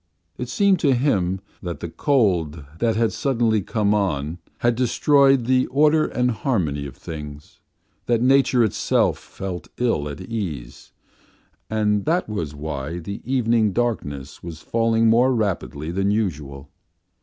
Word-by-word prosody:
It 125 - -5
seemed 200 -2 +3
to 140 -5 +3
him 95 -8 +1 0.2
that 85 -3 -5
the - - -5
cold 85 - 0
that 115 -2 +1
had 115 0 +1
suddenly 115 -5 +1
come 105 +1 0
on 85 -5 -1 0.2
had 120 0 +3
destroyed 135 +2 +3
the 130 +1 +2
order 150 +3 +3
and 125 0 0
harmony 90 - -1
of 65 - -12
things, 75 -2 -9 0.5
that 120 -1 +2
nature 130 0 +4
itself 110 - +1
felt 95 -2 -7
ill 115 -12 0
at 75 - -7
ease, 90 - -6 0.8
and 105 -2 +1
that 170 +3 +1
was 85 -9 -4
why 75 +1 -5
the 100 +4 -6
evening 115 -5 +2
darkness 75 - -3
was 85 -2 -8
falling 115 0 +1
more 125 +3 +4
rapidly 90 -7 -2
than 95 +2 0
usual. 75 -10 -3
105 Hz, 140 wpm, -22 LUFS, 80-120 Hz, 0.8 s, nature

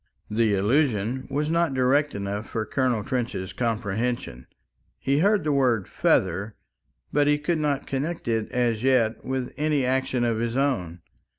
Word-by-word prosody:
The 110 -1 +2
allusion 120 +2 +1
was 150 +3 -1
not 170 -4 +1
direct 140 +2 +2
enough 100 +2 -4
for 110 -1 -2
Colonel 125 -3 0
Trench's 120 -8 -3
comprehension. 115 - -2 0.5
He 140 +1 +1
heard 200 +1 +3
the 150 - 0
word 125 -8 +2
"feather," 95 +4 +1 0.6
but 145 0 +3
he 145 0 +4
could 155 +2 -1
not 145 -2 0
connect 145 +4 -3
it 115 -2 -1
as 120 -3 0
yet 125 -4 +2
with 130 -1 -3
any 150 -3 +1
action 130 -1 0
of 115 -2 0
his 115 +2 -1
own. 90 -12 -1
125 Hz, 155 wpm, -25 LUFS, 110-140 Hz, 0.6 s, he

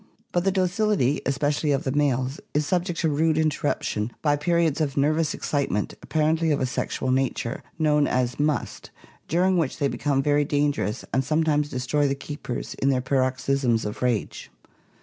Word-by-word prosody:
But 175 +1 0
the 195 - +3
docility, 185 - +1
especially 145 +2 0
of 140 -1 +1
the 130 - -1
males, 135 -2 0 0.2
is 150 0 +2
subject 175 +2 -1
to 160 - +2
rude 155 +2 +2
in 155 -1 +3
terruption 110 -7 -2
by 145 -2 +3
periods 160 0 +1
of 145 -3 -1
nervous 155 +2 +2
excitement, 140 -8 -1
apparently 160 +1 +1
of 145 - +2
a 130 - +1
sexual 130 +1 -2
nature, 130 -1 -1 0.2
known 150 -2 +3
as 125 0 0
"must," 150 0 -1 0.4
during 180 +3 +2
which 160 -6 0
they 145 - +1
become 140 -1 0
very 145 0 +3
danger 145 -4 0
ous 105 - -4
and 130 +2 +2
sometimes 155 0 +1
destroy 140 +2 0
the 135 - 0
keepers 140 -3 -6
in 135 - +3
their 130 -2 +2
paroxysms 130 -2 +1
of 105 - -5
rage. 125 -4 -1
145 Hz, 170 wpm, -25 LUFS, 130-155 Hz, 0.4 s, the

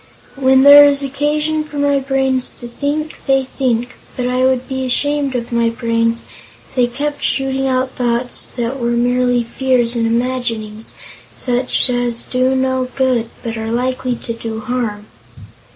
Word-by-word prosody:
When 265 -1 +4
there 285 +1 +10
is 285 -1 +3
occasion 300 +3 -1
for 300 -1 -9
my 285 -1 +2
brains 265 -1 0
to 240 - -8
think, 290 +5 -3
they 270 0 +3
think, 250 -2 -2 0.2
but 250 -1 -1
I 250 +1 0
would 260 -1 +1
be 265 0 -3
ashamed 280 +1 0
of 235 -1 -3
my 235 -1 +2
brains 230 0 0 0.5
if - - -23
they 250 -2 +3
kept 285 +4 -4
shooting 270 0 0
out 255 0 0
thoughts 245 0 -1
that 245 +2 -4
were 235 0 0
merely 245 0 +2
fears 245 0 +1
and 230 -1 +1
imaginings, 230 -3 -2 0.4
such 250 +1 +1
as 245 -1 -1
do 255 +1 0
no 260 -1 0
good, 255 -4 +1
but 230 -1 -4
are 225 0 -4
likely 250 +1 -1
to 230 - -5
do 225 -1 -5
harm." 235 -4 -3
255 Hz, 160 wpm, -17 LUFS, 235-270 Hz, 0.5 s, there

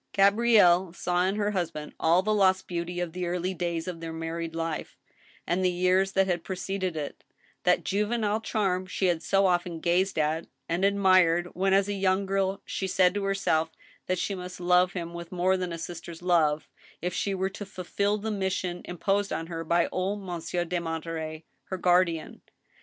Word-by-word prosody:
Gabrielle 200 -3 +5
saw 180 0 0
in 195 - 0
her 210 0 0
husband 165 -6 -3
all 170 +3 +4
the 215 +1 +1
lost 190 -2 +3
beauty 175 0 -3
of 175 -2 -3
the 180 -1 -3
early 180 +2 -1
da3rs 170 -1 -3
of 175 -2 -5
their 165 0 -5
married 165 0 -4
life, 165 -1 -4 0.5
and 180 +2 0
the 185 - +4
years 185 +2 +2
that 195 0 +4
had 175 -3 -1
preceded 190 -1 -3
it; 150 -2 -5 0.4
that - - +3
juve 205 +2 0
^ 240 0 0
nile 215 0 0
charm 190 -4 -1
she 190 - -1
had 175 -3 +2
so 195 +2 +2
often 175 -2 +1
gazed 180 +3 +1
at 155 +2 0 0.2
and 170 +3 -1
admired 185 -3 +4
when, 195 +1 +1
as 195 +1 +4
a 205 - -1
young 195 0 +1
girl, 195 0 -1
she 190 - -3
said 180 -1 +3
to 200 -1 -2
herself 165 -5 +1 0.4
that 185 - 0
she 200 - -1
must 180 -1 -7
love 180 +1 +3
him 170 -2 -5
with 170 0 -8
more 185 +1 +2
than 180 -2 -3
a 170 - -4
sis 170 +1 -6
ter's 170 0 -10
love 155 -4 +2 0.3
if 180 +1 -3
she 195 +2 -1
were 190 0 0
to 205 - -7
fulfill 200 +1 -1
the 220 +1 -3
mission 190 -3 -2
imposed 195 +3 -1
on 165 - -2
her 165 -1 -5
by 170 +1 +2
old 195 +2 -2
Monsieur 175 -1 -3
de 175 +1 -1
Monterey, 160 -1 -5 0.2
her 190 - -4
guardian. 175 -2 +1
180 Hz, 195 wpm, -27 LUFS, 170-195 Hz, 0.5 s, Gabrielle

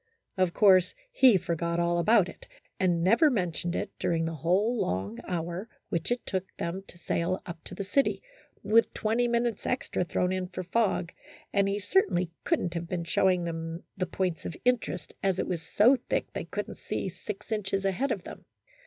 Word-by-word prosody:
Of 185 -3 +2
course, 190 - +5 0.2
he 260 - +6
forgot 170 0 -1
all 170 0 +2
about 210 +1 +5
it, - - -12 0.3
and 175 -3 +2
never 230 - +5
mentioned 175 - -1
it - - -2
during 165 -1 +1
the 165 - -2
whole 190 - +1
long 95 +5 -2
hour, 175 +4 -3 0.2
which 165 -1 -2
it 245 - -1
took 190 -1 -2
them 170 +3 -3
to - - -14
sail 175 +2 -1
up 170 -3 -8
to - - -7
the 200 - -3
city, 275 +8 +1 0.4
with 220 +3 +4
twenty 230 +3 +1
minutes 235 -2 0
extra 250 -7 -1
thrown 180 +1 0
in 185 -1 -2
for 185 0 -5
fog, 185 -2 0 0.4
and 200 -1 +3
he 200 - 0
certainly 190 - +1
could 330 - +2
n't 175 - -2
have 170 -1 -4
been 175 -2 -2
showing 180 +1 +2
them 165 0 -4
the 185 -1 -2
points 185 -3 -2
of 165 - -5
in 250 -1 +5
terest, - - -6
as 195 -2 +1
it - - 0
was 175 -3 -2
so 215 +10 +5
thick - - -1
they - - -4
could - - -4
n't - - -10
see - - -3
six 210 +2 -7
inches 195 -2 -1
ahead 215 +9 0
of - - -2
them. - - -10
185 Hz, 195 wpm, -29 LUFS, 170-210 Hz, 0.4 s, he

